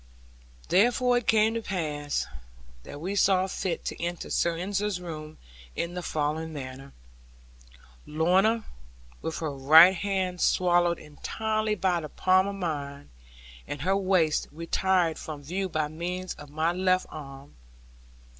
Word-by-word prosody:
Therefore 245 +4 +3
it 240 - -14
came 220 0 +4
to 230 - -2
pass, 150 -8 -2 0.6
that 145 - -9
we 185 +6 -3
saw 190 -1 +3
fit 185 -2 -3
to - - -4
enter 175 0 -4
Sir 170 -1 +1
Ensor's 200 +1 -2
room 155 -3 -8 0.4
in 170 +1 -3
the 180 - -4
following 155 0 -2
manner. 135 -1 -8 1.2
Lorna, 190 +9 +2 0.6
with 160 - -4
her 155 -3 -3
right 155 +7 +7
hand 190 -1 -2
swallowed 175 -1 +3
entirely 215 +8 -2
by 185 -3 +1
the 155 -2 -7
palm 185 +4 +3
of 200 - -4
mine, 145 - -5 0.6
and 145 -1 -5
her 190 +3 +2
waist 185 -5 +2
retired 170 +1 0
from 150 -2 -7
view 185 +6 -3
by 155 -3 -1
means 180 +4 -4
of 150 -1 -12
my 155 +3 0
left 185 +1 +1
arm. 140 -2 -10
175 Hz, 135 wpm, -27 LUFS, 155-190 Hz, 1.2 s, right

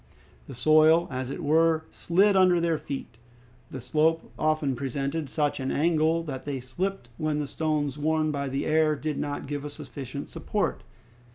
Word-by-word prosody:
The - - -8
soil, 155 +5 +5
as 130 0 -3
it 165 +5 -5
were, 160 +1 +3
slid 195 +4 +3
under 185 -2 +5
their 165 -2 +1
feet. 130 -4 -7 0.5
The 130 - -6
slope 155 +6 +1
often 155 -3 +1
presented 140 +4 -3
such 145 0 0
an 130 0 -2
angle 160 +1 +2
that 135 -5 -6
they 140 -2 -3
slipped 130 +2 -4
when 155 -1 -1
the 150 - -1
stones 150 -1 -1
worn 155 +1 +1
by 140 -1 -2
the 135 +2 -2
air 155 0 +3
did 150 0 -3
not 145 -1 -3
give 145 0 -4
a 150 - -5
sufficient 140 -2 -7
support. - - -2
150 Hz, 170 wpm, -27 LUFS, 140-160 Hz, 0.5 s, soil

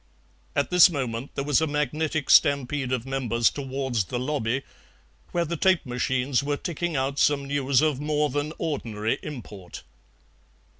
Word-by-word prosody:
At 140 +4 0
this 180 0 +8
moment 130 -5 -4
there 140 - -2
was 145 0 +2
a 160 - +1
magnetic 150 +1 -1
stampede 140 -1 +3
of 125 -2 -1
members 120 -4 +1
towards 130 -6 -2
the 125 - -4
lobby, 130 -1 -1 0.7
where 170 -1 0
the 170 +2 -3
tape 185 0 +2
machines 125 +1 0
were 145 +1 -1
ticking 175 0 -3
out 135 +1 -1
some 140 -1 +2
news 140 0 +1
of 150 -4 +1
more 150 -1 0
than 145 +2 -2
ordinary 115 -9 -2
import. 105 -10 -9
140 Hz, 150 wpm, -25 LUFS, 125-150 Hz, 0.7 s, this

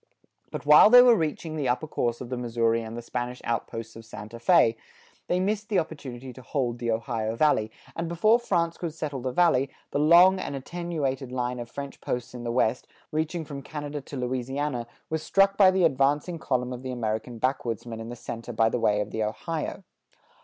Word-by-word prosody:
But - - -6
while 150 +7 +8
they 245 +2 +10
were 245 -1 +7
reaching 160 -2 -2
the 145 -4 -1
upper 125 +5 0
course 120 -5 -2
of 125 - -7
the 130 - -2
Missouri 115 -1 +1
and 115 +1 -7
the 120 - -6
Spanish 125 +1 -4
outposts 115 -1 -4
of 115 - -10
Santa 110 +1 -9
Fé, 115 -1 +4 0.5
they 180 - +1
missed 210 +3 -1
the 205 - +1
opportunity 135 -6 -4
to 130 - -12
hold 120 -1 -2
the 120 - -2
Ohio 115 -1 -1
Valley, 115 -6 +2 0.3
and 165 0 -3
before 215 +8 +4
France 170 -8 0
could 165 -3 -4
settle 145 -5 -4
the 130 +1 -2
Valley, 140 -4 +3 0.2
the - - 0
long 175 +5 +6
and 140 - -4
attenuated 140 -3 -3
line 125 -1 -2
of 120 -1 -6
French 140 -1 -7
posts 125 -1 -4
in 120 -1 -7
the 120 - -2
west, 120 0 +1 0.2
reaching 160 +2 -2
from 140 -2 -7
Canada 145 0 -6
to 135 +1 -8
Louisiana, 130 0 -2 0.2
was 160 -1 -1
struck 195 +3 +3
by 195 -2 +7
the 185 -1 +2
advancing 145 +3 +2
column 125 -3 -1
of 125 - -7
the 130 0 -5
American 115 0 -3
backwoodsmen 120 -2 -2
in 115 +1 -7
the 120 - -6
center 115 0 -7
by 115 -1 +3
the 120 - -1
way 105 -2 +2
of 105 0 -5
the 110 - -3
Ohio. 160 - -4
130 Hz, 205 wpm, -26 LUFS, 120-160 Hz, 0.5 s, they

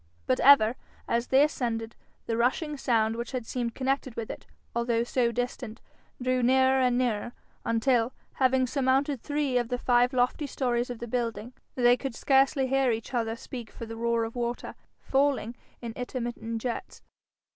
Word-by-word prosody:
But 130 - +1
ever, 255 -4 +6 0.3
as 235 +1 0
they 265 +2 +5
ascended, 230 -6 -2 0.3
the 225 - -1
rushing 260 +6 0
sound 225 -5 +1
which 235 +2 -5
had 250 -3 -3
seemed 235 -1 -3
connected 265 -2 -1
with 225 -2 -4
it, - - -10 0.3
although 235 -1 +1
so 240 0 +1
distant, 245 -1 -4 0.4
drew 255 0 +1
nearer 260 +1 +4
and 250 -1 +2
nearer, 240 -2 -1 0.3
until, 230 +1 +2 0.2
having 260 -1 +3
surmounted 270 0 +1
three 290 -4 0
of 240 -1 -3
the 245 - -1
five 245 0 +3
lofty 255 +3 +1
stories 245 -2 -1
of 245 - -5
the 235 - -6
building, 230 -1 -3 0.2
they 245 -1 +5
could 265 -2 -5
scarcely 270 +1 +3
hear 270 0 +2
each 225 +2 -3
other 225 -2 0
speak 235 -1 -8
for 230 - -8
the 225 0 -7
roar 235 0 0
of 225 +1 -5
water, 240 0 -3 0.3
falling 270 -4 0 0.3
in 235 - -4
intermittent 235 -2 -4
jets. 250 +8 -5
245 Hz, 170 wpm, -28 LUFS, 230-260 Hz, 0.4 s, ever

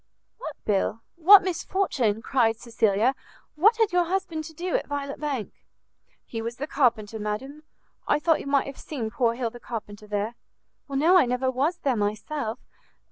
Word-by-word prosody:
"What - - -6
bill? 210 +2 0
What 380 +4 +8
misfortune?" 315 - 0
cried 230 -5 +2
Cecilia; 225 0 +1 0.4
"what 425 +9 +4
had 445 -4 +2
your 355 -1 +3
husband 345 -3 -2
to 320 - -10
do 355 +2 -2
at - - -1
Violet 280 -1 -4
Bank?" 280 -8 -3 0.7
"He 225 - -5
was 230 +1 -4
the 275 - -4
carpenter, 230 -7 +1
madam. 255 +8 -4 0.5
I - - +3
thought 320 +1 +2
you - - -7
might 280 -1 +2
have 275 - -8
seen 235 -8 -5
poor 235 -2 +1
Hill 235 -2 -2
the 240 - -11
carpenter 210 -3 -7
there." 210 +2 -2 0.6
"No, 310 +7 +4
I 265 - +3
never 250 +1 0
was 290 +7 0
there 270 -6 0
myself. 220 +4 -2
260 Hz, 170 wpm, -26 LUFS, 225-315 Hz, 0.7 s, What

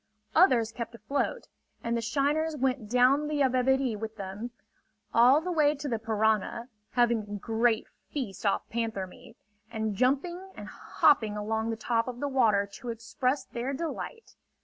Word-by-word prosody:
Others 250 - +5
kept 235 0 -6
afloat, 275 +6 -2 0.4
and 235 0 0
the 235 - 0
shiners 295 +6 0
went 255 -5 -1
down 255 +5 +4
the 300 -1 -1
Yabebirì 260 -1 +2
with 220 0 -5
them, 200 +4 -5 0.6
all 250 +5 +6
the 360 +2 -3
way 300 -3 +3
to 290 +1 -5
the 230 -4 -1
Parana, 220 +2 0 0.2
having 240 -2 +3
a 205 0 -7
great 225 +2 +1 0.3
feast 240 -10 -4
off 200 -2 +1
panther 225 -4 -2
meat, 180 - -15 0.3
and 220 -2 -2
jumping 280 - +1
and - - -8
hopping 215 -7 +2
along 220 +2 -1
the 225 - -2
top 230 +1 0
of 245 -1 -5
the 285 - -1
water 220 -7 +3
to 245 - -7
express 255 +4 -1
their 245 +3 -4
delight. 335 - -5
240 Hz, 160 wpm, -29 LUFS, 220-275 Hz, 0.6 s, all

